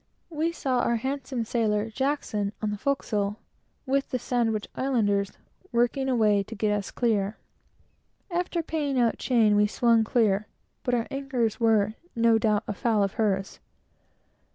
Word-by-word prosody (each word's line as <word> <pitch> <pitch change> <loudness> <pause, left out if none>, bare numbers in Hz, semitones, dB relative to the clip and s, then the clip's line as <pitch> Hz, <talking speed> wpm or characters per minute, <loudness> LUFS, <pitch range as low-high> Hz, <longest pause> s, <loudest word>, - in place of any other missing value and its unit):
We 320 +1 0
saw 265 -6 -1
our 235 0 +1
handsome 260 0 -3
sailor, 220 -2 0
Jackson, 220 -6 -1
on 215 -1 -2
the 210 - -3
forecastle, 210 -7 -1 0.5
with 275 0 0
the 255 - -1
Sandwich 230 -3 -1
Islanders, 205 -7 0 0.4
working 245 +3 +1
away 215 -5 +3
to 225 +3 -8
get 210 0 +1
us 200 -1 -3
clear. 215 -4 0 0.9
After 345 -1 -1
paying 295 -4 -1
out 235 -2 +2
chain, 225 -5 +3
we 210 0 +4
swung 230 +1 +3
clear, 215 -3 +1 0.3
but 245 - 0
our 230 -1 0
anchors 255 -5 -1
were 215 -2 +3 0.2
no 230 -1 +4
doubt 210 -2 +2
afoul 215 0 +1
of 195 - -1
hers. 195 -2 -1
230 Hz, 145 wpm, -26 LUFS, 210-260 Hz, 0.9 s, we